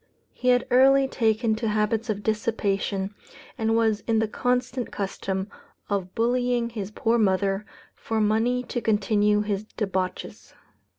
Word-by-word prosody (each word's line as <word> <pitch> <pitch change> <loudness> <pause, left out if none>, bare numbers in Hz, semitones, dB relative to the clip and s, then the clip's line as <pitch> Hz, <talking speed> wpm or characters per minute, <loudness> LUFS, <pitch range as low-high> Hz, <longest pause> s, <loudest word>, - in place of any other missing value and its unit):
He 255 - -5
had 245 -1 +4
early 270 +2 +5
taken 225 -2 +1
to 225 0 -2
habits 215 +2 0
of 205 -1 -2
dissipation, 205 -3 -1 0.4
and 225 0 0
was 220 -2 +2
in 225 -1 +2
the 220 0 +2
constant 250 +2 -1
custom 190 -1 -3 0.4
of 190 -2 -2
bullying 240 0 +1
his 205 -4 -5
poor 225 +2 +1
mother, 195 0 +1 0.3
for 225 -1 -3
money 225 +4 +1
to 240 -1 -4
continue 210 -1 +2
his 205 -1 -2
debauches. 190 -4 -4
220 Hz, 135 wpm, -25 LUFS, 205-235 Hz, 0.4 s, early